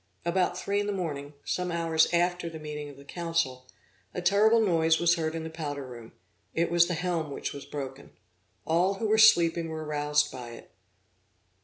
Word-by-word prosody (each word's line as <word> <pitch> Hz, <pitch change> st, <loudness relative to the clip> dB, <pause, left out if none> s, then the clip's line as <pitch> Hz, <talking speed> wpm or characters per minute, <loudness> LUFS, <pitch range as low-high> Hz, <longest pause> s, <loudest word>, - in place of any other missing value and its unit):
About 180 Hz, +1 st, +1 dB
three 200 Hz, +2 st, -1 dB
in 205 Hz, -, -1 dB
the -, -, 0 dB
morning, 150 Hz, -6 st, -4 dB
some 180 Hz, -1 st, -2 dB
hours 165 Hz, -1 st, +2 dB
after 175 Hz, 0 st, +1 dB
the 165 Hz, -, -8 dB
meeting 150 Hz, -1 st, -6 dB
of 140 Hz, -, -13 dB
the 140 Hz, -, -14 dB
council, 165 Hz, -6 st, -2 dB, 0.5 s
a -, -, -1 dB
terrible 210 Hz, +5 st, +5 dB
noise 165 Hz, -6 st, +3 dB
was 170 Hz, 0 st, +4 dB
heard 160 Hz, -2 st, -2 dB
in 165 Hz, -, -4 dB
the 160 Hz, -, -5 dB
powder 145 Hz, -4 st, -5 dB
room; 120 Hz, -3 st, -11 dB, 0.4 s
it 170 Hz, +1 st, +1 dB
was 170 Hz, 0 st, +5 dB
the 175 Hz, -, -1 dB
helm 170 Hz, -3 st, -2 dB
which 140 Hz, -, -4 dB
was 140 Hz, -, -8 dB
broken. 135 Hz, -1 st, -7 dB, 0.6 s
All 180 Hz, +4 st, +2 dB
who 220 Hz, +3 st, -2 dB
were 215 Hz, +1 st, +3 dB
sleeping 170 Hz, -6 st, +5 dB
were 160 Hz, -1 st, -5 dB
roused 150 Hz, 0 st, +1 dB
by 125 Hz, -3 st, -8 dB
it. -, -, -13 dB
165 Hz, 190 wpm, -28 LUFS, 150-175 Hz, 0.6 s, terrible